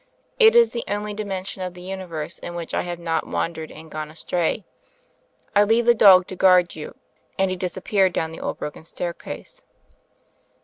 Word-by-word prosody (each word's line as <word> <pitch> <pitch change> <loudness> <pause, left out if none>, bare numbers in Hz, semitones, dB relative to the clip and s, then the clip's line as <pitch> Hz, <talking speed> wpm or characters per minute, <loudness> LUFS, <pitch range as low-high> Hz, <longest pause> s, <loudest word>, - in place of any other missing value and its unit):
It 450 0 +7
is 475 -1 +6
the 235 - -3
only 210 +1 -3
dimension 195 -2 -5
of 180 -1 -4
the 180 - -11
Universe 180 -5 -6
in 175 - -7
which 170 -1 -5
I - - +1
have 175 -1 -5
not 165 -1 -2
wan 170 - -1
dered 160 -1 -7
and 155 0 -12
gone 155 0 -5
astray. 170 +5 -2 0.9
I 205 - +7
leave 225 +3 +2
the 240 - +6
dog 190 -5 +7
to 185 - -6
guard 180 -1 +5
you 155 -1 -8 0.2
;" - - -40
and 190 -1 +2
he - - -1
disappeared 185 +1 0
down 160 -1 -2
the 165 - -9
old - - -3
broken 150 - -7
staircase. 175 - -7
185 Hz, 190 wpm, -23 LUFS, 170-205 Hz, 0.9 s, It